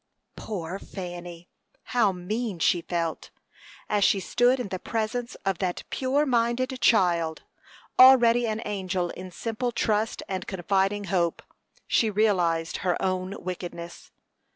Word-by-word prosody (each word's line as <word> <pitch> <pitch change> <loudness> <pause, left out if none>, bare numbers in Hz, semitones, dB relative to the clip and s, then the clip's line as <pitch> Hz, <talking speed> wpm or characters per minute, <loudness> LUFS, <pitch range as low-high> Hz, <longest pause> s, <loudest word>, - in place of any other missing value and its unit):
Poor 185 -3 -5
Fanny! 175 -3 -8 0.5
How 230 -5 +4
mean 200 +3 -3
she 170 +1 +2
felt! 165 -2 -3 0.6
As 205 -1 +1
she 195 - +4
stood 245 +7 +2
in 245 - -4
the 185 - -4
presence 235 +3 -3
of 195 -2 0
that 180 -2 -2
pure 275 +3 +1
minded 250 +1 +1
child, 170 -7 +2 0.6
already 240 -2 +7
an 220 +1 -2
angel 185 -3 -2
in 185 0 -8
simple 230 +6 -3
trust 220 -1 0
and 190 -1 -4
confiding 195 +2 0
hope, 170 -3 +1 0.4
she 225 - +2
realized 180 -6 +1
her 180 -3 -1
own 185 +1 -2
wickedness. 175 -1 -7
195 Hz, 130 wpm, -26 LUFS, 175-230 Hz, 0.6 s, already